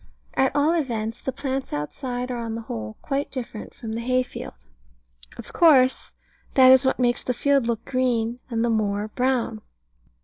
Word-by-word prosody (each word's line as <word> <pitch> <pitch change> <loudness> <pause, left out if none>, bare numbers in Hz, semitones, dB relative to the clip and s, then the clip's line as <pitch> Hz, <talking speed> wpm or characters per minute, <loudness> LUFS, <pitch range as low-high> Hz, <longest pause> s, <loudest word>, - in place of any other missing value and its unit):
At 265 0 +1
all 295 +3 +3
events, 230 -8 -2
the 265 - -2
plants 270 0 -3
outside 245 - -4
are 245 - -3
on 230 -1 -4
the 230 - -4
whole 110 - -6
quite 280 +1 -2
different 240 -5 -7
from 225 -2 -7
the 225 +1 -3
hay 255 +1 +1
field. 250 - -8 0.8
Of - - -10
course: 270 -6 +4 0.4
that 260 -1 +8
is 260 0 +7
what - - +1
makes 245 -1 +1
the 250 - -2
field 275 -2 +2
look 230 -2 -2
green 245 -2 0
and 230 -1 0
the 235 - +1
moor 210 -1 0
brown. 245 -2 0
245 Hz, 175 wpm, -24 LUFS, 225-265 Hz, 0.8 s, that